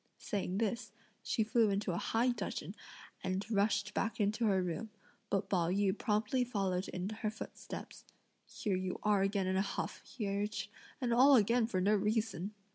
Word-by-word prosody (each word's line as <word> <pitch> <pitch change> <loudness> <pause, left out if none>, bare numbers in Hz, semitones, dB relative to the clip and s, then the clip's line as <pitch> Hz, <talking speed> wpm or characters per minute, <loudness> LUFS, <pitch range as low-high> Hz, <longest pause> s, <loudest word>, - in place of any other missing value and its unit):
Saying 190 -2 -2
this, 225 0 -1 0.3
she 220 - +1
flew 225 0 +3
into 200 -1 0
a 170 - -1
high 235 +3 +2
dudgeon 205 -4 -3 0.5
and 185 +1 -1
rushed 205 0 +2
back 230 - -1
into 215 +2 +2
her 195 -2 +3
room; 180 +5 -3 0.4
but 195 0 0
Pao 175 -4 +1
yü 195 +1 +2
promptly 215 +4 +1
followed 195 -6 -1
in 180 +1 -3
her 215 0 -2
footsteps: 215 - -8 0.4
"Here 200 -3 -2
you 185 0 -2
are 210 -2 +3
again 195 0 +1
in 190 0 +1
a - - +4
huff," 200 - -3
he 225 -5 -5
urged, 205 +1 -2 0.3
"and 245 -3 +1
all 260 +2 +7 0.3
for 190 -5 -1
no 205 +3 +4
reason! 210 -1 0
205 Hz, 170 wpm, -34 LUFS, 195-220 Hz, 0.5 s, all